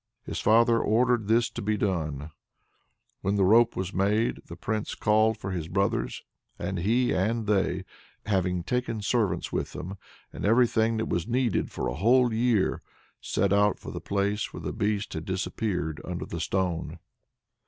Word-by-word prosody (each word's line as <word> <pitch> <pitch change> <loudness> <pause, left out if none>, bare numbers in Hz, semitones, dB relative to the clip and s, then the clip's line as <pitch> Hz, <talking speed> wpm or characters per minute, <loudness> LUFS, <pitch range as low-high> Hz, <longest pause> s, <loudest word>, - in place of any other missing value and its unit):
His - - -5
father 115 +1 +4
ordered 120 0 +2
this 115 +2 +3
to - - -5
be 105 +1 0
done. 80 -7 -2 0.9
When 100 +2 0
the 100 - +3
rope 115 +4 +5
was 95 +1 -3
made, 105 +4 +1
the 85 - -8
Prince 105 +4 -3
called 110 +1 +3
for 95 - -5
his 85 -4 -3
brothers, 100 +6 -1 0.3
and 95 +1 -3
he 115 +8 +2
and 110 +4 0
they, 95 -3 +1 0.4
having 90 -4 0
taken 115 -1 -2
servants 110 -2 0
with - - -2
them, 95 +3 -7 0.3
and - - -7
everything 115 0 +3
that 110 - -1
was 85 +1 -1
needed 120 -2 0
for - - -3
a - - -2
whole 120 - +3
year, 115 -3 +1 0.4
set 100 -1 +1
out 100 0 +3
for - - -8
the - - -6
place 100 +1 -1
where - - -8
the - - -4
Beast 105 0 -1
had 80 - -4
disappeared 95 -4 -2
under 90 -1 -4
the 85 - -6
stone. 85 -2 -1
105 Hz, 165 wpm, -27 LUFS, 95-115 Hz, 0.9 s, rope